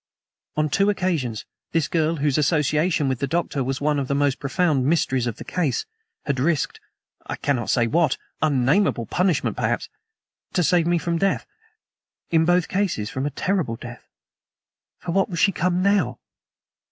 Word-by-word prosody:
On 155 0 +2
two 195 +7 +2
occasions 165 - -1 0.3
this 165 -3 +2
girl, 165 0 +1
whose 145 -1 +1
association 150 +1 +2
with 130 -2 -1
the 140 - -1
Doctor 155 -3 -1
was 135 +1 -2
one 150 0 +1
of 135 - -2
the 140 - 0
most 145 -1 +1
profound 145 -1 +1
mysteries 130 -6 +1
of 115 - -2
the - - -9
case, 170 - -1 0.4
had 140 -3 -1
risked 150 +1 0 0.5
I - - -3
cannot 130 -5 -1
say 120 - +3
what; 165 +7 +2 0.2
unnameable 140 - +2
punishment, 180 - 0
perhaps - - -1 0.6
to 180 - +2
save 170 0 +3
me 175 0 +3
from 170 +1 -1
death; 195 +2 +1 0.9
in 160 -1 +4
both 175 0 +3
cases 185 - -1
from 135 +2 -2
a - - 0
terrible 175 - -1
death. 120 +1 -10 0.9
For 175 - -5
what 195 +3 +2
was 175 - -4
she 195 - +4
come 180 +1 0
now? 190 -12 +2
155 Hz, 165 wpm, -23 LUFS, 135-175 Hz, 0.9 s, in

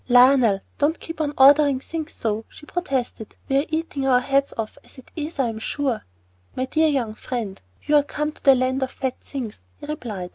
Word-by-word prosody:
"Lionel, 245 -5 +6 0.2
don't 300 +3 +2
keep 330 -1 -6
on 295 -2 0
ordering 280 0 +6
things 320 +3 -5
so," 220 0 -2
she 300 - -14
protested. 265 - -3
"We 270 - +2
are 285 - -1
eating 315 -4 -2
our 250 -2 +5
heads 275 +2 +1
off 225 +4 -4
as - - -14
it 260 - -15
is, 310 0 -5
I 270 - +2
am 225 -1 -4
sure." 260 0 -2 0.5
"My 255 - -1
dear 315 +4 +2
young 255 -7 0
friend, 220 -4 -5 0.2
you 300 - +2
are - - +6
come 300 +1 -3
to - - -19
the 270 -1 +7
Land 260 +1 0
of 265 - 0
Fat 260 -1 -4
Things," 245 - -6 0.2
he - - -10
replied. 225 - -5
270 Hz, 210 wpm, -23 LUFS, 245-295 Hz, 0.5 s, the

